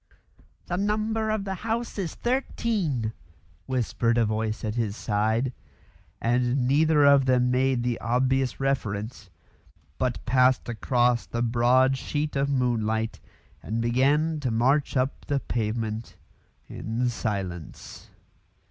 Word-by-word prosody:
"The 175 - -2
number 215 +2 0
of 215 -2 0
the 195 -1 -3
house 225 +3 -3
is 180 -4 -3
thirteen," 205 - -1 0.5
whispered 120 -2 0
a 115 - +4
voice 110 0 -2
at 110 -1 -2
his 110 -2 -2
side; 110 +4 0 0.7
and 125 +2 +1
neither 150 +2 +4
of 140 -2 +5
them 125 -1 +3
made 130 -1 +1
the 120 -1 -1
obvious 130 +2 +1
reference, 110 -6 -2 0.7
but 125 -2 -1
passed 130 0 +3
across 120 0 +1
the 120 0 -2
broad 125 +3 +3
sheet 150 0 -3
of 140 0 +1
moonlight 115 -4 0 0.4
and 110 +2 -3
began 140 +7 +2
to 135 -4 -2
march 130 +6 +2
up 130 +2 -1
the 140 -1 +1
pavement 110 -1 -3 0.5
in 115 +3 -2
silence. 95 -8 -5
125 Hz, 120 wpm, -26 LUFS, 115-140 Hz, 0.7 s, of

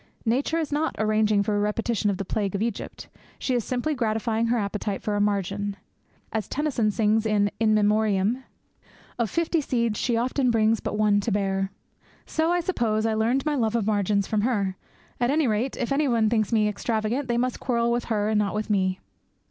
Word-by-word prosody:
Nature 265 +8 +1
is 315 -3 -2
not 305 +2 0
arranging 215 -1 +2
for 210 +1 -1
a - - +1
repetition 210 +1 0
of 195 - -1
the 195 - -4
plague 200 0 -2
of 200 - -2
Egypt; 230 -3 -5 0.3
she 260 - -2
is 240 -2 +1
simply 255 +7 -1
gratifying 225 -2 0
her 240 +1 +2
appetite 205 -1 -2
for 210 -2 -1
a 205 - +1
margin. 200 0 -1 0.6
As 220 -2 -2
Tennyson 275 -7 0
sings 215 +1 +2
in 205 -1 +2
'In 215 -1 +3
Memoriam,' 215 +2 +2 0.8
of 230 -3 +1
fifty 335 - 0
seeds 235 -6 -1
She 240 -3 +1
often 255 +2 +1
brings 225 -1 +3
but - - -3
one 210 -1 +3
to 210 +3 -2
bear. 195 -1 0 0.6
So 320 +1 0
I 350 0 +2
suppose 225 - 0
I 225 - +1
learned 235 +5 +1
my 305 - +1
love 230 -5 0
of 225 -4 +1
margins 205 -1 +1
from 215 0 0
her. 205 -5 0 0.4
At 240 0 +2
any 300 +2 +2
rate, 230 +3 0
if 245 - -2
anybody 250 -6 +2
thinks 220 -1 +1
me 215 -2 +3
extravagant, 220 +5 -1
they 240 -1 0
must 250 +1 -1
quarrel 235 -2 0
with 240 0 0
her 210 -2 0
and 215 -1 +2
not 205 -1 0
with 215 +1 -2
me. 185 -2 +1
220 Hz, 200 wpm, -25 LUFS, 205-240 Hz, 0.8 s, In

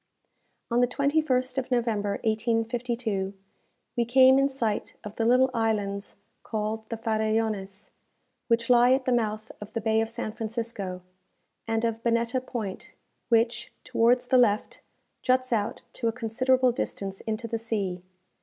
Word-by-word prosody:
On 235 - +3
the 245 - +4
21st 270 -1 +1
of 260 - -5
November, 225 -5 0
1852, 225 -2 -1 0.6
we 240 - +2
came 260 +2 +6
in 275 0 +3
sight 230 -6 -2
of 210 0 -8
the 225 - 0
little 255 +2 +4
islands 205 -3 -1 0.3
called 220 0 -3
the 230 - -3
Farellones, 215 -3 -1 0.6
which 230 -1 +2
lie 245 +1 +6
at 260 0 0
the 255 - +1
mouth 215 -2 -1
of 210 - -9
the 230 - -1
bay 220 0 +2
of 225 - -2
San 220 -1 -4
Francisco, 220 -5 -4 0.6
and 225 0 0
of 225 0 -2
Bonetta 235 +2 +1
Point, 220 -7 -6 0.3
which, 230 0 +2
towards 245 0 +2
the 255 0 +4
left, 215 -4 +1 0.4
juts 255 -1 +1
out 210 -1 -1
to 235 - -2
a - - +2
considerable 255 +2 +2
distance 195 -4 -4
into 220 +2 -2
the 230 0 -2
sea. 200 -6 -2
230 Hz, 145 wpm, -27 LUFS, 215-245 Hz, 0.6 s, came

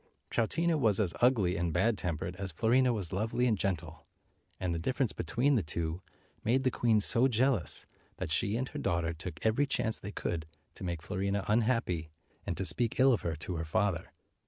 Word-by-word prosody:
Troutina 160 +8 +1
was 110 -6 +3
as 95 -6 +1
ugly 115 -8 +3
and 85 0 -1
bad 115 +8 +2
tempered 85 -1 -3
as 95 -1 -5
Fiorina 125 +9 +3
was 100 -6 -2
lovely 110 +5 0
and 115 -3 +3
gentle, 85 -5 -4 0.5
and 90 -2 -1
the 85 - -2
difference 130 - -1
between 125 - 0
the 120 - +3
two 80 +1 -4 0.4
made 130 +4 +2
the 130 - +2
queen 115 -3 +2
so 120 +5 +6
jealous, 120 - +3 0.3
that - - -4
she 105 +3 +1
and 130 +2 -2
her - - -6
daughter 85 -3 -1
took 80 0 -7
every 120 +6 +2
chance 110 -4 -1
they 100 - -7
could 80 -5 -4 0.3
to - - -10
make 85 -3 -4
Fiorina 100 +2 -2
unhappy, 105 -8 +1 0.4
and 85 - -2
to 95 - -2
speak 115 +6 +2
ill 130 0 +6
of 115 - 0
her 85 -2 -2
to 80 +4 -6
her 80 - -3
father. 85 +2 -1
100 Hz, 195 wpm, -31 LUFS, 85-120 Hz, 0.5 s, so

